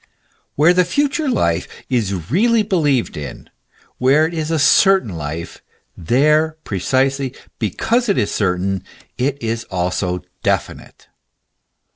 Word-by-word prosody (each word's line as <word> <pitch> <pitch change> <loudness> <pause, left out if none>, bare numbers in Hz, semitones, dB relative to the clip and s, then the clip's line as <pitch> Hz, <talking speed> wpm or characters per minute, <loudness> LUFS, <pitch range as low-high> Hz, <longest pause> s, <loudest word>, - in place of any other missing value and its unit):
Where 155 +5 +5
the 180 0 +4
future 285 - 0
life 85 - 0 0.2
is 100 -8 -2
really 225 +6 +3
believed 150 - 0
in, 75 -1 -8 0.5
where 140 +5 +4
it 165 - -4
is 160 -2 -3
a 165 - +1
cer 190 +6 +5
tain 115 - -10
life, 80 -1 -6 0.3
there, 150 - +2
precisely 135 +7 0 0.2
because 225 - 0
it 200 - +2
is 105 - 0
certain, 95 -1 -1 0.4
it 140 +2 0
is 115 0 -2
also 90 -1 -2 0.2
definite. - - -3
135 Hz, 125 wpm, -19 LUFS, -, 0.5 s, Where